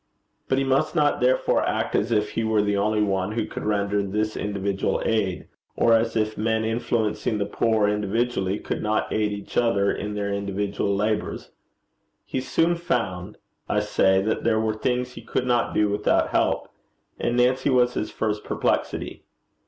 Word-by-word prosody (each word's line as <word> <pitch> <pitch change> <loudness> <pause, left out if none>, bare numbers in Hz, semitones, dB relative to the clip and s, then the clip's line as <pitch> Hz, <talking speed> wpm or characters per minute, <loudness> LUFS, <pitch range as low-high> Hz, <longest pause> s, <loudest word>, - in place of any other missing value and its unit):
But 130 - +1
he 135 - +2
must 135 +5 +1
not 150 -5 +2
therefore 130 +1 +3
act - - -1
as 110 +3 +1
if 105 -2 +1
he 115 - -1
were 110 -1 +2
the 105 0 0
only 105 +1 +1
one 95 0 -1
who 115 - -1
could - - -7
render 100 -1 0
this 105 +2 -2
individual 100 -1 -1
aid, 100 -5 0 0.3
or 115 - +4
as 115 0 +2
if 110 -1 -1
men 110 0 +1
influencing 115 -1 -1
the 100 - -1
poor 110 +1 +1
individually 105 -1 0
could - - -4
not 110 0 -1
aid 105 -1 +1
each 100 0 -6
other 100 -4 +3
in 105 0 -4
their 100 -1 -2
individual 100 0 -1
labours. 105 +1 -2 0.7
He 130 - -3
soon 165 +6 +2
found, 105 - -2 0.3
I - - +2
say, 95 0 +2
that 110 +2 -1
there 110 -1 +2
were 110 0 0
things 125 +3 -1
he - - -10
could 125 - -2
not 120 -1 +1
do 105 - +3
without 105 +1 +1
help, - - 0 0.5
and 120 - 0
Nancy 125 +3 +3
was 125 -2 +3
his 110 - -2
first 105 -1 -2
perplexity. - - -2
110 Hz, 175 wpm, -24 LUFS, 100-120 Hz, 0.7 s, or